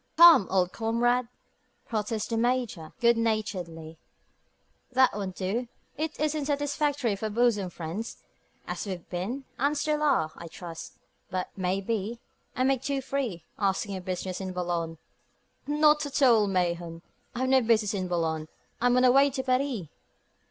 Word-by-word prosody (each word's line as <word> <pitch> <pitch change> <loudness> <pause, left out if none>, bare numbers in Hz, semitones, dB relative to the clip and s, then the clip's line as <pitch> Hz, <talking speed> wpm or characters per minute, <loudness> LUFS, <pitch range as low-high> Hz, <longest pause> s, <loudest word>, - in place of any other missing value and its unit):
"Come, 335 - +9
old 185 -1 +2
comrade!" 235 +2 +1 0.6
protests 215 -1 -2
the 230 - -3
Major, 230 -9 -1
good 235 -1 +4
naturedly, 180 -8 -2 0.9
"that 260 0 +5
won't 195 -3 -4
do; 210 +6 -2 0.3
it 310 +2 -3
isn't 305 -1 0
satisfactory 285 -4 0
for 215 +2 -3
bosom 215 -4 +2
friends, 175 +6 -5 0.5
as - - -4
we've 185 -3 -5
been, 215 +10 -3
and 285 +3 +2
still 300 +1 0
are, 265 - +2
I 170 - -9
trust. 165 0 -9 0.3
But, 185 -1 -3
maybe, 195 +4 -2 0.4
I 255 - +1
make 265 -1 +2
too 280 0 -1
free, 250 - -3
asking 200 +1 0
your 190 -1 -4
business 185 +1 -4
in 185 -1 -4
Boulogne?" 170 -2 -2 0.7
"Not 300 0 +4
at 280 - -2
all, 225 -5 +6
Mahon. 170 -3 -1 0.3
I 245 - -2
have 260 - +1
no 265 0 +5
business 220 -3 +2
in 185 -2 -2
Boulogne; 160 -3 -1 0.3
I'm 245 0 +4
on 250 - +4
the 250 - +7
way 275 +2 +5
to 265 -1 -3
Paris." 255 -6 0
220 Hz, 150 wpm, -28 LUFS, 185-260 Hz, 0.9 s, Come